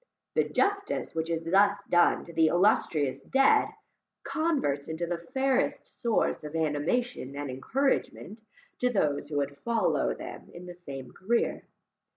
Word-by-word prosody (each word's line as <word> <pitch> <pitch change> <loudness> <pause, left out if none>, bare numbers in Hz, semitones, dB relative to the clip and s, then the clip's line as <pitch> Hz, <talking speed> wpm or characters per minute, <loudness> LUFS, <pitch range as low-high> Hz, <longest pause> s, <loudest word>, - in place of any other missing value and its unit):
The - - +2
justice 400 0 0
which 160 0 -2
is 165 -1 -1
thus 200 +4 +3
done 175 0 +3
to 170 - -12
the 160 -1 +4
illustrious 155 -7 +2
dead, 270 - +3 0.6
converts 280 - 0
into 160 +2 -3
the 170 0 -3
fairest 265 +7 0
source 230 -9 -1
of 150 +1 -7
animation 160 - -1
and 145 -1 -4
encouragement 225 - -1 0.4
to 250 - +2
those 150 -10 0
who 145 - -2
would 140 0 -2
follow 230 +3 +1
them - - -9
in 175 +1 -9
the 180 - -8
same 140 -7 -9
carreer. 230 +5 -1
175 Hz, 145 wpm, -28 LUFS, 150-240 Hz, 0.6 s, the